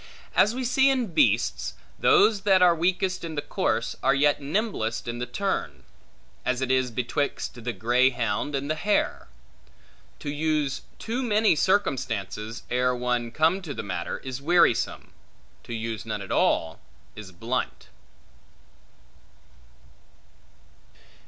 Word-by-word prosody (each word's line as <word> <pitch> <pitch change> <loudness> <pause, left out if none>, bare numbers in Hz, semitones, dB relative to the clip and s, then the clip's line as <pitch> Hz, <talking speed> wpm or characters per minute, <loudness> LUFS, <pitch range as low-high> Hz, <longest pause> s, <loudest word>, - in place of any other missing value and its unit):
As 215 +3 +4
we 260 - -2
see 265 +2 +4
in 250 -9 0
beasts, 300 - +2
that - - -28
those 405 - +5
that 190 -2 +4
are 175 -1 +6
weakest 185 +2 0
in 165 -2 -5
the 145 - -1
course, - - -1
are 135 - +3
yet 145 +1 +3
nimblest 145 - -2
in 120 0 -4
the 125 - -3
turn; 195 +11 -3 0.6
as 125 -1 0
it 130 -1 -1
is 130 -1 +2
betwixt 120 0 -3
the 120 - -1
greyhound 120 +2 +1
and 140 +1 -2
the 155 - +1
hare. 205 +6 0 0.9
To 145 - -5
use 150 -2 -1 0.2
too 235 +3 -3
many 215 -5 +3
circumstances, 115 - -1
ere 125 0 +2
one 125 -1 -1
come 160 +9 +2
to 155 -6 -6
the - - -4
matter, 90 -4 -4
is 130 0 -5
wearisome; 170 -5 +2 0.5
to 120 - -6
use 115 -1 -4
none 110 -2 -4
at 95 - -9
all, 80 0 +1 0.4
is 105 -3 -9
blunt. 115 +8 -4
140 Hz, 135 wpm, -26 LUFS, 120-185 Hz, 0.9 s, are